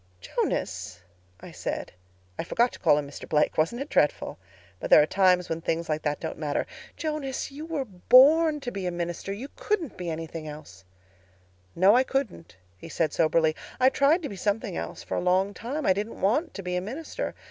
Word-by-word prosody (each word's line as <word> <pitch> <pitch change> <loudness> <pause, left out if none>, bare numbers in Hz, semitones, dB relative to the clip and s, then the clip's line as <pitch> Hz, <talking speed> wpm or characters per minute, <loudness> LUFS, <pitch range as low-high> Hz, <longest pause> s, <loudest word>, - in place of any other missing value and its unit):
"'Jonas,' 90 0 -3 0.4
I - - -10
said—I 90 - -7
forgot 235 +8 +1
to - - -10
call 145 - +4
him 145 -1 -2
Mr. 140 - -10
Blake. 150 -1 +2
Wasn't 165 +10 +1
it 280 - -4
dreadful? 150 0 +1 0.4
But - - -4
there - - +9
are 150 - +5
times 180 0 +3
when 165 0 -3
things 165 0 -2
like 155 0 0
that 150 -1 -1
don't 160 - -5
matter—'Jonas, 270 - -4
you 300 +3 -8
were 305 -5 -2
born 280 - +5
to 245 - -4
be 195 -4 -4
a - - -1
minister. 175 +2 -4
You 220 +7 -5
couldn't 360 - -2
be 180 -2 -4
anything 160 0 -5
else.' 150 -10 -11 0.9
"'No, 190 +5 +6
I 250 - +6
couldn't,' 265 - -3 0.2
he 165 - -10
said 160 -2 0
soberly. 160 0 +2 0.2
'I 255 +1 +6
tried 285 +6 +3
to - - -3
be 200 - -7
something 205 +1 -1
else - - -5
for - - -4
a - - 0
long 185 +3 +2
time—I 240 +1 0
didn't 210 +4 -5
want 295 - +1
to 195 - -6
be 180 0 -2
a 180 - 0
minister. 300 - -5
190 Hz, 190 wpm, -27 LUFS, 160-265 Hz, 0.9 s, there